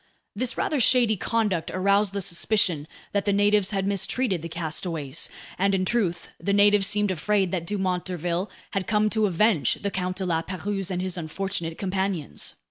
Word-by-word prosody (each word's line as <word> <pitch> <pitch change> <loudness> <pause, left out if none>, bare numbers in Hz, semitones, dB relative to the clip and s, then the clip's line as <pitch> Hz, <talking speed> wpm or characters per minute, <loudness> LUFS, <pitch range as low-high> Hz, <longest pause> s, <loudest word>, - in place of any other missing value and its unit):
This 245 +3 -2
rather 300 - 0
shady 240 -2 +4
conduct 210 -4 0
aroused 200 +1 +2
the 200 -1 -1
suspicion 175 -4 +1 0.2
that 200 -1 0
the 205 - +2
natives 205 0 +3
had 195 -2 -1
mistreated 200 0 0
the 165 - -6
castaways; 160 -3 -3 0.3
and 195 +1 +3
in 185 -1 0
truth, 190 -6 -1
the 200 - 0
natives 205 -1 +5
seemed 205 -1 +2
afraid 190 +1 +1
that 170 -3 -2
Dumont 185 -3 -1
d'Urville 180 +1 -2 0.2
had 195 -2 -2
come 215 -1 +2
to 215 -2 +2
avenge 185 - +2
the 200 - -4
Count 185 -1 -2
de 190 - -2
La 165 -2 +1
Pérouse 195 +2 -3
and 180 -1 -2
his 185 -1 -1
unfortunate 170 0 -3
companions. 190 - -2
195 Hz, 175 wpm, -25 LUFS, 175-205 Hz, 0.3 s, natives